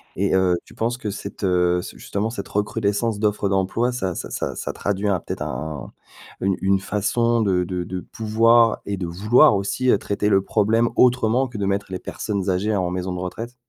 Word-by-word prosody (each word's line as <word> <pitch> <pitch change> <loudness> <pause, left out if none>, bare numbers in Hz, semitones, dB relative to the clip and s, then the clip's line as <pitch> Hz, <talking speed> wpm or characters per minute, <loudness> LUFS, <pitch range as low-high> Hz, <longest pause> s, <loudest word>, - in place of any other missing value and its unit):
Et 100 +2 0
heu, 90 -2 +3
tu - - -16
penses 120 +2 -1
que 105 -5 -4
cette 105 - -8
heu, 90 -1 +2
ce - - -9
justement 105 +3 -3
cette 100 -4 -6
recrudescence 105 +1 -1
d'offres 105 -2 0
d'emploi, 95 +6 +1
ça 95 -8 -3
ça - - -5
ça - - -3
ça - - -4
traduit 100 +1 -1
un, 95 - +1
peut-être - - -6
un 75 +2 -5 0.5
une 95 -1 +1
une 95 0 +3
façon 115 +4 +1
de 90 -4 +1
de 90 0 -3
de 90 +1 -5
pouvoir 115 +2 +3
et 100 - -2
de 90 - -3
vouloir 105 - +4
aussi, 115 +6 -1
heu, - - +4
traiter 105 +1 -1
le 95 -1 +4
problème 110 +4 +2
autrement 125 +1 +3
que 120 - -8
de 100 - -1
mettre 100 +1 -1
les 95 - -3
personnes 100 -3 -3
âgées 100 +4 0
en 90 -2 0
maison 90 0 -3
de 90 - -4
retraite? 115 +7 -6
100 Hz, 205 wpm, -22 LUFS, 95-115 Hz, 0.5 s, vouloir